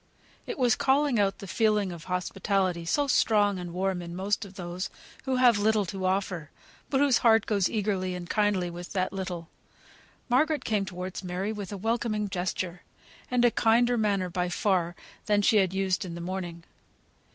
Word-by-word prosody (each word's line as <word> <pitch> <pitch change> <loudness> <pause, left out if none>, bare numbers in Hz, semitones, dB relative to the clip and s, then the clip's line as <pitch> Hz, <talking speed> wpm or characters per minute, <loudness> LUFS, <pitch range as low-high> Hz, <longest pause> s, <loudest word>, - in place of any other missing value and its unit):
It - - -4
was 245 -4 +3
calling 275 -3 +2
out 195 -1 +2
the - - -9
feeling 210 -1 +1
of 170 -2 -9
hospitality, 185 -1 -1
so 285 - +1
strong 205 -7 +3
and 175 -1 -6
warm 185 0 -1
in 170 0 -7
most 200 +3 -1
of 195 -1 -13
those 180 +2 -4 0.4
who 265 -1 0
have 245 -4 +5
little 215 0 +2
to 190 +1 -4
offer, 185 -5 -1 0.4
but 270 - +1
whose 280 -3 +4
heart 225 -2 +4
goes 200 -4 +1
eagerly 195 -4 -1
and 175 -1 -6
kindly 205 -4 +1
with 175 +1 -8
that 185 -1 -1
little. 180 -3 -4 0.8
Margaret 300 +5 +2
came 210 -3 +1
towards 185 0 -6
Mary 185 +3 -2
with 205 -3 -6
a 200 - -4
welcoming 215 0 -1
gesture, 180 -1 -3 0.5
and 245 -1 +3
a 240 - +5
kinder 240 +2 +3
manner 200 -5 0
by 180 0 -1
far 175 -2 0 0.3
than 205 -1 +3
she 215 - +4
had 190 -3 +3
used 190 -1 0
in 175 -3 -6
the - - -6
morning. 175 -1 -5
195 Hz, 180 wpm, -28 LUFS, 180-220 Hz, 0.8 s, have